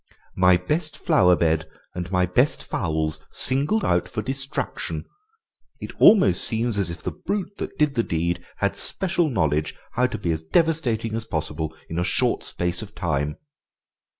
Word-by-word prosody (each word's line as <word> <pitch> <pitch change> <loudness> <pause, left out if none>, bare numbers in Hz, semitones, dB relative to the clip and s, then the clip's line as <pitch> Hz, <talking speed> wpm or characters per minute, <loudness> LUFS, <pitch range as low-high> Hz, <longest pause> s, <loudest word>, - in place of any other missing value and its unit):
My 90 -1 +5
best 155 - -2
flower 90 -1 +4
bed 80 -2 0 0.2
and 90 0 -5
my 90 -1 +3
best 125 +11 +2
fowls 80 -4 -2
singled 145 +11 +2
out 85 0 +1
for 110 - -4
destruction; 135 +2 -3 0.7
it - - -7
almost 100 - +7
seems 115 -1 +1
as 95 -4 0
if 85 - -7
the - - -2
brute 195 +2 -4
that - - -5
did 150 -2 +2
the 120 - +2
deed 85 -2 -2
had - - -1
special 175 -4 0
knowledge 75 - 0 0.2
how 125 +1 +2
to - - -5
be 85 -4 -1
as 80 -1 -2
devastating 120 - +1
as 115 0 -3
possible 80 -1 -3
in 80 - -3
a - - +1
short - - 0
space 90 +2 -2
of 110 - -10
time." 75 -3 -1
95 Hz, 165 wpm, -24 LUFS, 85-135 Hz, 0.7 s, almost